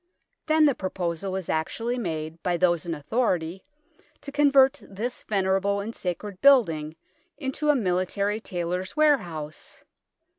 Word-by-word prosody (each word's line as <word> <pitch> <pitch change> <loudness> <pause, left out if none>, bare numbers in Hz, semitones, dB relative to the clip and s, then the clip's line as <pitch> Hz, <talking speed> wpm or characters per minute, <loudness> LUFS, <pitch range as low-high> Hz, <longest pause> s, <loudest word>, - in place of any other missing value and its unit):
Then 310 0 +5
the 285 - +4
proposal 185 -2 -3
was 190 -2 -4
actually 230 +10 -2
made 160 -4 -4
by 175 -1 0
those 175 -1 +1
in 165 - -2
authority 180 - -1 0.6
to 285 - -8
convert 275 -2 +4
this 225 +6 -5
venerable 195 0 0
and 215 +3 -5
sacred 185 +1 -5
building 165 - +4 0.4
into 300 +1 -2
a 295 - +6
military 200 0 0
tailors' 180 - -4
ware 300 -2 +5
house 155 -5 -9
190 Hz, 135 wpm, -26 LUFS, 170-245 Hz, 0.6 s, a